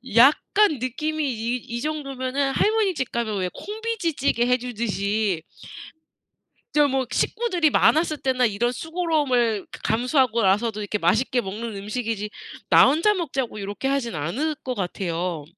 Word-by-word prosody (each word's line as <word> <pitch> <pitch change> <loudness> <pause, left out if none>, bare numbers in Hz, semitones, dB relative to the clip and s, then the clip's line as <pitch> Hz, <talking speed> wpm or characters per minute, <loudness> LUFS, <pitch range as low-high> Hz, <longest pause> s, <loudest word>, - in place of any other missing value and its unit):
약간 300 - +5
느낌이 305 +5 -2
이 230 +2 -2
이 235 0 -6
정도면은 275 -2 -2
할머니 425 -3 +2
집 260 -5 -3
가면 220 -4 -2
왜 180 -1 -1
콩비지찌개 390 - -1
해주듯이 215 -7 -1 1.3
저 295 -1 +5
뭐 265 -1 0
식구들이 360 -10 +1
많았을 310 0 +3
때나 255 -2 +2
이런 225 +3 0
수고로움을 285 - 0 0.2
감수하고라서도 230 -3 +2
이렇게 210 0 -2
맛있게 220 +9 +2
먹는 215 +2 -5
음식이지 210 0 -3 0.4
나 - - +8
혼자 330 +10 +3
먹자고 270 - -3
요렇게 205 +7 -3
하지는 240 - -1
않을 280 - -1
것 255 -1 -3
같아요. 175 -4 -3
250 Hz, 315 characters per minute, -24 LUFS, 215-300 Hz, 1.3 s, 나